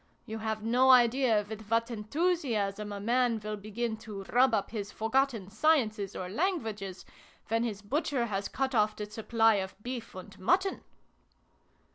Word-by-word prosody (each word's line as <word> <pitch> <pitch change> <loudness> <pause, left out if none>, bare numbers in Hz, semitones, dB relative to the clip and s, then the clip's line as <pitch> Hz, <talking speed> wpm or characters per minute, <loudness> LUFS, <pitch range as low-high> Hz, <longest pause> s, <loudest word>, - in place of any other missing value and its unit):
You 220 -2 -5
have 220 -1 -3
no 250 +4 +3
idea 240 -3 +5
with 220 0 -7
what 230 +1 +1
enthusiasm 220 - -1
a 200 - -5
man 235 +2 +1
will 215 0 -3
begin 220 +2 -3
to 215 -3 -8
rub 255 +2 +5
up 210 -3 0
his 205 -3 -4
forgotten 225 -3 0
sciences 220 -6 +1
or 185 - -4
languages, 215 - -2 0.4
when 225 +1 +1
his 215 -3 -4
butcher 275 +2 0
has 200 -3 -2
cut 270 0 -2
off 215 -2 +2
the 210 - -4
supply 225 +1 +2
of 190 -1 -4
beef 245 -4 -6
and 185 - -10
mutton 370 - +1
225 Hz, 155 wpm, -30 LUFS, 210-250 Hz, 0.4 s, idea